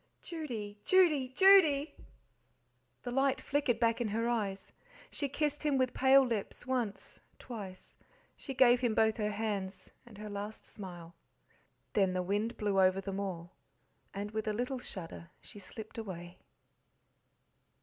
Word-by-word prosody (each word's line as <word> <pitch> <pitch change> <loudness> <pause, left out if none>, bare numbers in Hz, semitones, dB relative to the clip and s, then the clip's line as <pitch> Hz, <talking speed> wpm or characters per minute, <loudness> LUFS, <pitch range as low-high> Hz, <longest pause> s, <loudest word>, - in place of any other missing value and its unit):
"Judy, 230 -12 -6
Judy, 310 -9 +4
JUDY!" 325 -7 +6 1.1
The 245 - -4
light 270 +1 +2
flickered 280 -5 0
back 230 0 +2
in 235 - 0
her 225 +3 -1
eyes. 205 -5 -2 0.4
She 285 - -2
kissed 295 +1 -1
him 295 -3 +1
with 255 -1 +1
pale 265 +1 +6
lips 230 -3 -3
once, 245 -5 -3 0.2
twice; 200 -7 -9 0.4
she 270 - -7
gave 245 -1 +6
him 240 -3 0
both 220 0 +3
her 210 -2 0
hands, 205 -3 -3 0.2
and 220 -4 -13
her 210 +1 -7
last 205 +1 -6
smile. 175 -4 -9 0.8
Then 195 -3 +3
the 185 0 -1
wind 205 +5 -1
blew 205 -2 +1
over 185 0 +4
them 195 0 -4
all, 175 -3 -5 0.6
and, 205 +1 -5
with 215 0 -3
a 215 - +1
little 250 +4 -2
shudder, 170 -6 -8
she 205 - -11
slipped 220 +3 -9
away. 175 -4 -7
220 Hz, 145 wpm, -32 LUFS, 200-260 Hz, 1.1 s, JUDY